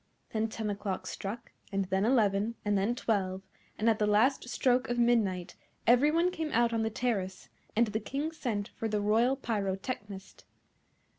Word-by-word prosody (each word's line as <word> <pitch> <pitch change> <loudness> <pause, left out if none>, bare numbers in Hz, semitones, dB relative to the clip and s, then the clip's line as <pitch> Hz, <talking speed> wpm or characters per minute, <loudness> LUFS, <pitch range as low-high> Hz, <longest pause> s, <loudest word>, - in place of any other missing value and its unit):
Then 220 0 0
ten 220 -1 -3
o'clock 200 -1 -3
struck, 205 +4 -6 0.2
and 195 -1 0
then 190 +2 +1
eleven, 220 -2 +2
and 205 0 +2
then 200 +5 +1
twelve, 195 -5 -1 0.3
and 220 - 0
at 225 -1 +3
the 210 - +2
last 245 +5 +3
stroke 250 0 +2
of 240 - -1
midnight 215 -7 +1 0.3
every 250 +5 +5
one 335 +3 +2
came 320 -4 -3
out 235 0 +3
on 225 - +1
the 220 - 0
terrace, 210 -5 -2 0.3
and 235 +2 +5
the 215 0 -2
King 280 +8 -3
sent 220 -10 -3
for 225 - -4
the 210 -1 0
Royal 225 +6 +3
Pyrotechnist. 200 -3 -4
220 Hz, 170 wpm, -30 LUFS, 200-240 Hz, 0.3 s, every